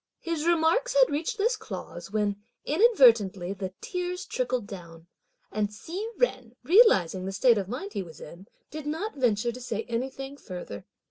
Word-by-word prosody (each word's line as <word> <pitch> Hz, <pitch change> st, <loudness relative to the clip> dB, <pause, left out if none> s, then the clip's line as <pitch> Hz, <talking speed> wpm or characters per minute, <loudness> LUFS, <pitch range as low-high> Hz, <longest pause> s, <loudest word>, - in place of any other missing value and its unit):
His 335 Hz, -1 st, -2 dB
remarks 345 Hz, +10 st, +2 dB
had -, -, +5 dB
reached 315 Hz, +11 st, -2 dB
this 460 Hz, +4 st, +2 dB
clause, 175 Hz, -, -8 dB
when 205 Hz, -1 st, -1 dB, 0.2 s
inadvertently 235 Hz, -, +4 dB
the 190 Hz, -1 st, -5 dB
tears 360 Hz, -5 st, -3 dB
trickled 250 Hz, -3 st, -2 dB
down; 170 Hz, -5 st, -10 dB, 0.5 s
and 210 Hz, 0 st, -1 dB
Hsi 335 Hz, -, -6 dB, 0.2 s
Jen 255 Hz, -, 0 dB
realising 195 Hz, -, +5 dB
the -, -, -2 dB
state 225 Hz, +3 st, +4 dB
of 190 Hz, -1 st, -4 dB
mind 205 Hz, -4 st, -5 dB
he 205 Hz, -, -2 dB
was 165 Hz, -4 st, -11 dB
in, 175 Hz, +6 st, -11 dB, 0.2 s
did 305 Hz, -1 st, -6 dB
not 330 Hz, +9 st, -3 dB
venture 240 Hz, -3 st, +1 dB
to 250 Hz, +2 st, -9 dB
say 225 Hz, -3 st, -3 dB
anything 265 Hz, +4 st, -4 dB
further. 180 Hz, -, -8 dB
245 Hz, 160 wpm, -27 LUFS, 200-335 Hz, 0.5 s, had